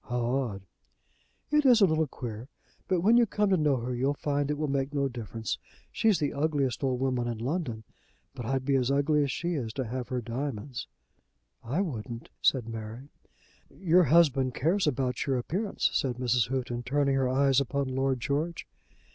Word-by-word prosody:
"How 125 0 -2
odd!" 120 -6 -1 0.9
"It 300 0 +4
is 250 -4 +6
a 200 - +7
little 160 -3 +1
queer, 120 -2 -7 0.4
but 185 -3 +1
when 225 +6 +5
you 240 -1 +5
come 210 0 +1
to - - +5
know 150 -3 +2
her 125 +1 -3
you'll 135 +4 0
find 145 0 -1
it 150 - -1
will 155 0 -1
make 140 +1 -1
no 140 -1 +2
difference. 115 -3 -5 0.3
She's 220 -4 +3
the 145 - -1
ugliest 140 -4 0
old 130 -2 0
woman 125 -2 0
in 120 -1 -3
London, 120 -2 -3 0.5
but 130 -3 -7
I'd 130 +3 -1
be 140 0 +2
as 125 -1 +1
ugly 145 +2 +2
as 140 -2 0
she 175 +6 -2
is 125 -8 -3
to 130 0 -3
have 125 +2 -4
her 125 - -2
diamonds." 125 - -4 0.8
"I 135 +11 -1
wouldn't," 120 - -5
said 125 -4 +2
Mary. 115 +4 -7 0.6
"Your 180 -1 +3
husband 135 -4 +4
cares 170 +6 +1
about 130 -3 -1
your 135 -2 +1
appearance," 190 - -1
said 130 -3 0
Mrs. 125 -2 +1
Houghton, 125 -2 -2
turning 140 +2 +1
her 135 -1 +1
eyes 135 +1 +3
upon 140 +1 -1
Lord 130 0 0
George. 155 +6 -2
135 Hz, 185 wpm, -28 LUFS, 125-150 Hz, 0.9 s, a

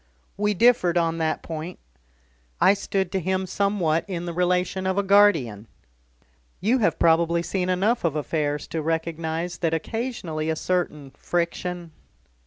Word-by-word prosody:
"We 210 +1 0
differed 185 -5 +4
on 165 -1 +1
that 160 -1 -1
point. 165 +2 -6 0.8
I 195 - +6
stood 195 -2 -2
to 190 - 0
him 190 +2 -1
somewhat 185 -4 0
in 175 -3 -4
the 170 - -4
relation 180 +1 0
of 190 +1 0
a 200 - +2
guardian. 165 - +3 0.9
You 240 +6 +2
have 170 -8 +1
probably 170 +1 +3
seen 180 +1 -2
enough 200 +6 +1
of 165 -3 0
affairs 150 -1 -1
to 160 - -2
recognise 165 +1 -2
that 165 -2 +1
occasionally 165 -5 -3
a 160 - +1
certain 155 -5 -2
friction 175 +1 -3
175 Hz, 145 wpm, -24 LUFS, 160-190 Hz, 0.9 s, I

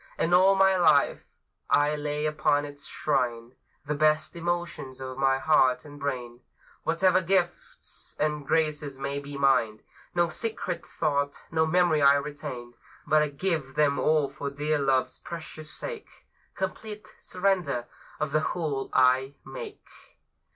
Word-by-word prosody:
And 170 - +1
all 190 +2 +6
my 195 0 +4
life 155 -5 +3 0.4
I 145 +1 +3
lay 150 0 -2
upon 150 -1 +1
its 145 -1 -9
shrine 120 -4 -1 0.3
The 150 - -1
best 155 +1 +2
emotions 170 -6 -3
of 130 0 -6
my 135 -1 +3
heart 130 -3 +3
and 145 -1 -11
brain, 125 -4 -4 0.4
Whatever 180 +3 +3
gifts 175 0 -2
and 150 -1 0
graces 150 -2 0
may 140 +1 -2
be 140 0 -7
mine; 125 -6 +2 0.3
No 175 0 +3
secret 180 -2 -4
thought, 145 -2 -1
no 160 -1 +2
memory 170 -2 +3
I 140 0 +7
retain, 140 -4 -5 0.3
But 150 -2 +2
give 155 -8 -1
them 145 -2 +2
all 155 -2 +3
for 140 +1 -5
dear 150 +2 -1
Love's 130 -2 +1
precious 155 -2 -8
sake; 465 - -6 0.5
Complete 210 +2 -5
surrender 180 -10 0 0.3
of 155 -2 -1
the 155 - +3
whole 155 -4 -2
I 130 +2 +3
make. 450 -5 -9
150 Hz, 135 wpm, -27 LUFS, 140-170 Hz, 0.5 s, I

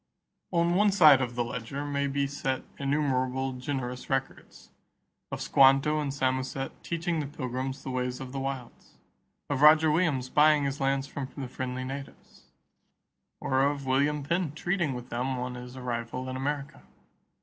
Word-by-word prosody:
On 170 -1 +2
one 205 +3 +4
side 155 -8 +7
of 125 -1 -2
the 120 - +1
ledger 125 +4 -5
may 140 -1 -1
be 140 0 0
set 135 -1 -2 0.2
innumerable 135 -2 0
generous 125 -1 -4
records 135 0 -4 0.6
of - - -4
Squanto 135 +3 +5
and 145 -2 -2
Samoset 130 0 -1
teaching 170 0 -1
the 145 - -2
Pilgrims 130 0 -4
the 135 - -4
ways 125 0 -2
of 130 -1 -7
the 135 - -4
wilds; 135 -3 -6 0.5
of 140 -1 -1
Roger 155 +1 +7
Williams 150 -6 +1
buying 150 +2 +4
his 140 +1 -2
lands 135 0 +1
from 140 -1 -6
the 135 -2 -4
friendly 130 0 -4
natives; 135 +1 -9 0.9
or 130 0 +1
of 140 0 0
William 140 +3 +1
Penn 170 0 -1
treating 170 -3 -1
with 125 0 -8
them 130 +2 -2
on 125 0 -3
his 125 +1 -9
arrival 125 0 -4
in 130 - -4
America. 140 +2 -3
135 Hz, 160 wpm, -28 LUFS, 130-145 Hz, 0.9 s, side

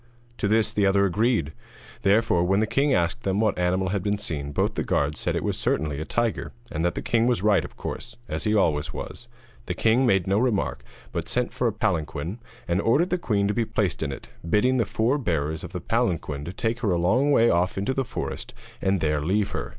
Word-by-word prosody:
To - - +1
this 110 +1 +2
the 100 -2 +3
other 100 0 +4
agreed; 100 - +1 0.5
therefore, 100 -3 +3
when 95 +3 +2
the 110 - +3
king 135 +6 +1
asked 90 +1 +1
them 100 -2 0
what 110 0 +2
animal 90 +1 +1
they - - -2 0.2
had 100 0 0
seen, 75 -8 -4
both - - 0
the - - -2
guards 75 +1 0
said - - -1
it - - -1
was - - -1
certainly 75 -1 0
a - - -3
tiger, 120 +3 -1 0.2
and 80 - -2
that 85 - +1
the - - -4
king 115 0 +2
was 120 -6 +1
right 105 -2 +4
of - - -10
course, - - -6
as - - -3
he 105 0 +2
always 75 -7 +1
was. 120 - -7 0.4
The - - -2
king 120 +4 +3
made 95 -5 +3
no 100 +2 +2
remark, 120 -5 0 0.3
but - - -3
sent 125 0 -1
for 125 - 0
a - - +2
palanquin, 90 -3 -2 0.3
and 85 +3 +1
ordered 150 - +2
the 180 - +1
queen 100 -10 +1
to 105 - 0
be 120 - +1
placed 105 -5 -1
in 75 -2 -1
it, 65 - -8 0.2
bidding 125 +8 +3
the 115 - +2
four 120 +8 +1
bearers 80 - -1
of - - -7
the - - -4
palanquin 75 -5 -1
to 85 - -5
take 115 +5 -2
her 115 -4 0
a 90 - +2
long 115 +12 +2
way 115 -4 +5
off 90 +2 +1
into 100 +7 0
the 135 - 0
forest - - -5 0.3
and 95 -1 +1
there 75 -1 +1
leave 100 +6 0
her. - - -4
100 Hz, 235 wpm, -25 LUFS, 85-115 Hz, 0.5 s, way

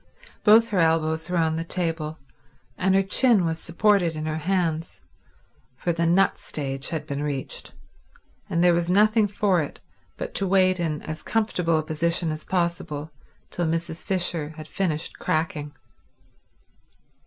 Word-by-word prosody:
Both 225 +2 +6
her 200 - 0
elbows 160 0 +2
were 180 - 0
on 160 -1 +1
the 165 - -2
table 165 -3 -2 0.6
and 190 +1 +2
her 195 - +4
chin 205 -1 +4
was 165 0 -1
supported 175 -1 +2
in 155 0 -4
her 155 0 -2
hands, 165 -2 -1 0.8
for 175 - -1
the 170 0 0
nut 190 +3 +3
stage 135 -2 -4
had 155 -2 -3
been 140 -2 -4
reached, 145 -3 -4 0.7
and 170 +1 +1
there 175 -1 +6
was 170 0 0
nothing 215 +3 +4
for 195 -3 +1
it 145 - -6 0.4
but - - -5
to 195 - +1
wait 185 -1 +3
in 155 -3 -2
as 155 0 -6
comfortable 180 -7 0
as 155 - 0
position 165 +1 0
as 155 0 -5
possible 170 -4 -2 0.4
till 175 -2 -1
Mrs. 165 0 -3
Fisher 175 -5 -1
had 155 -1 -8
finished 165 -3 -2
cracking. 155 -2 -1
170 Hz, 155 wpm, -24 LUFS, 155-185 Hz, 0.8 s, Both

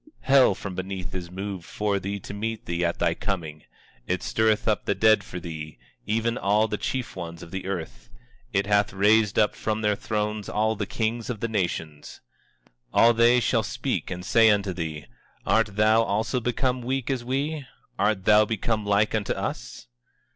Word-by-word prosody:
24:9 - - -19
Hell 130 -8 +6
from 95 -1 -6
beneath 95 0 -5
is 90 -2 -5
moved 95 0 -5
for 100 +2 -1
thee 100 +1 -4
to 100 - -9
meet 110 +2 -4
thee 85 0 -2
at 85 0 0
thy - - +2
coming; 80 -6 -4 0.4
it 90 0 -1
stirreth 110 -1 +1
up 110 -2 +1
the 100 - +1
dead 110 0 +4
for 90 - -7
thee, 80 -3 -7 0.3
even 115 +2 0
all 105 +2 +2
the 105 - -2
chief 130 -2 -3
ones 85 -2 -7
of 85 - -12
the 95 0 -5
earth; 80 - -5 0.4
it 100 -2 +1
hath 100 0 +2
raised 105 +1 +3
up 105 - +4
from 110 0 -2
their 105 -1 +2
thrones 105 0 -3
all 110 +1 +1
the 100 -1 -3
kings 115 +1 -2
of 120 -4 -3
the 115 - -1
nations. 85 -8 -3 0.8
24:10 - - +4
All 120 +1 +7
they 120 +2 +5
shall 120 - +2
speak - - -3
and 90 0 -6
say 115 +2 +5
unto 100 -2 +1
thee: 80 -4 -5 0.4
Art 105 - +2
thou 110 +2 +4
also 110 +4 0
become 125 +1 -1
weak 130 +2 -2
as 130 -3 -2
we? 140 +4 -2 0.4
Art 100 -1 +1
thou 105 0 +6
become 110 0 -1
like 100 +1 +2
unto 105 -3 0
us? - - -5
105 Hz, 190 wpm, -25 LUFS, 95-110 Hz, 0.8 s, All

